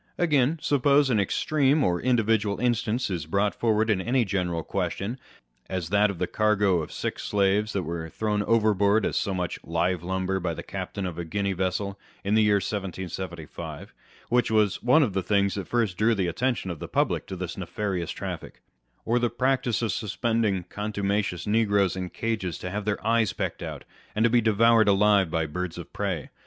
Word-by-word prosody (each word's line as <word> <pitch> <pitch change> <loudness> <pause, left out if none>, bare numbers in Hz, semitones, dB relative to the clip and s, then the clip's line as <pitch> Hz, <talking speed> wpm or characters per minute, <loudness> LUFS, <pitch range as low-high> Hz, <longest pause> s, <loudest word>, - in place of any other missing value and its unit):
Again, 150 -3 +2
suppose 140 0 +3
an 110 - +3
extreme 140 - +2
or 90 -1 +1
individual 110 -4 +1
instance 120 -2 0
is 85 -4 -3
brought 100 +4 +1
forward 110 -1 +1
in 105 -4 +1
any 120 +4 +1
general 90 -4 -1
question, 100 +6 -3 0.5
as 90 -3 -3
that 105 +2 +4
of 100 - -4
the - - 0
cargo 105 -4 +2
of 75 - -7
sick - - -4
slaves 100 +1 +1
that 95 - -1
were 80 0 -4
thrown 105 +3 -1
overboard 105 -1 +3
as - - -1
so 100 - 0
much 90 -1 -3
live 85 +1 0
lumber 95 +1 -1
by 85 -2 -2
the - - -7
captain 100 - -5
of 85 -2 -5
a - - -2
Guinea 100 +4 -1
vessel, 95 +2 -2 0.2
in 100 - 0
the 110 - +5
year 105 -1 +4
1775, 95 -4 -5 0.4
wThich 125 0 +3
was 110 -3 +2
one 145 +6 +5
of 110 -8 -1
the 95 - 0
things 100 0 +1
that 100 -2 -4
first 115 -6 0
drew 115 +2 +3
the 95 -3 0
attention 95 +3 -1
of 85 - -7
the - - -6
public - - 0
to 95 - -5
this 90 -1 -5
nefarious 95 -2 -3
traffic,1 - - -6 0.5
or 120 +2 +2
the 120 0 +1
practice 125 -1 0
of 110 - +1
suspending 110 -1 0
contuma 100 +2 -1
cious 90 -3 -5
negroes 100 -4 +2
in 90 -1 -4
cages 110 -8 -3
to 90 - -6
have 105 +1 -3
their 105 -2 -2
eyes 115 -2 +2
pecked - - -3
out, - - -6 0.3
and 110 - +2
to 115 - +4
be 120 -1 +4
devoured 115 +1 +4
alive 100 -2 +4
by 80 0 0
birds 90 +2 -4
of 85 - -9
prey. 95 -7 -3
100 Hz, 195 wpm, -26 LUFS, 90-115 Hz, 0.5 s, the